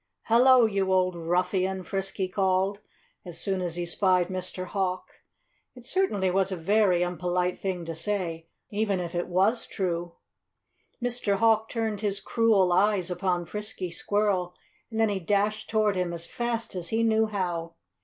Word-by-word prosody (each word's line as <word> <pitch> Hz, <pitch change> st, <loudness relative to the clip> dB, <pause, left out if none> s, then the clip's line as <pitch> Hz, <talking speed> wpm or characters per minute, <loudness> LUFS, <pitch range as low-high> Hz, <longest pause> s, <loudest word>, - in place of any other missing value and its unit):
"Hello, 245 Hz, +1 st, +6 dB
you 195 Hz, -3 st, 0 dB
old 185 Hz, -1 st, +2 dB
ruffian!" 180 Hz, +3 st, 0 dB
Frisky 195 Hz, 0 st, -2 dB
called, 190 Hz, +1 st, +1 dB, 0.4 s
as 175 Hz, -3 st, -8 dB
soon 190 Hz, -2 st, -1 dB
as 175 Hz, -2 st, -2 dB
he 175 Hz, 0 st, -2 dB
spied 180 Hz, 0 st, +2 dB
Mr. 185 Hz, 0 st, -4 dB
Hawk. 185 Hz, -1 st, -3 dB, 0.5 s
It 245 Hz, -1 st, -13 dB
certainly 240 Hz, -, +1 dB
was 195 Hz, +1 st, +1 dB
a -, -, -1 dB
very 185 Hz, 0 st, +3 dB
impolite 180 Hz, +1 st, -1 dB
thing 185 Hz, -3 st, -3 dB
to 165 Hz, -, -4 dB
say, 165 Hz, -2 st, -3 dB, 0.2 s
even 205 Hz, -2 st, 0 dB
if 175 Hz, -1 st, -4 dB
it 175 Hz, 0 st, -2 dB
was 195 Hz, +6 st, +1 dB
true. 175 Hz, -3 st, -3 dB, 0.9 s
Mr. 245 Hz, -4 st, 0 dB
Hawk 220 Hz, +1 st, +3 dB
turned 220 Hz, -3 st, -2 dB
his 200 Hz, -2 st, -1 dB
cruel 200 Hz, -4 st, +3 dB
eyes 190 Hz, -1 st, +2 dB
upon 180 Hz, -1 st, -1 dB
Frisky 210 Hz, -1 st, -5 dB
Squirrel 190 Hz, -1 st, 0 dB, 0.3 s
and 225 Hz, -1 st, -4 dB
then 225 Hz, -1 st, +4 dB
he 200 Hz, -2 st, -1 dB
dashed 205 Hz, +3 st, 0 dB
toward 215 Hz, -2 st, +2 dB
him 180 Hz, -2 st, -1 dB
as 170 Hz, 0 st, -5 dB
fast 235 Hz, +1 st, -3 dB
as 175 Hz, -2 st, -5 dB
he 225 Hz, +1 st, +1 dB
knew 220 Hz, -1 st, +3 dB
how. 175 Hz, -5 st, -3 dB
190 Hz, 160 wpm, -27 LUFS, 180-210 Hz, 0.9 s, Hello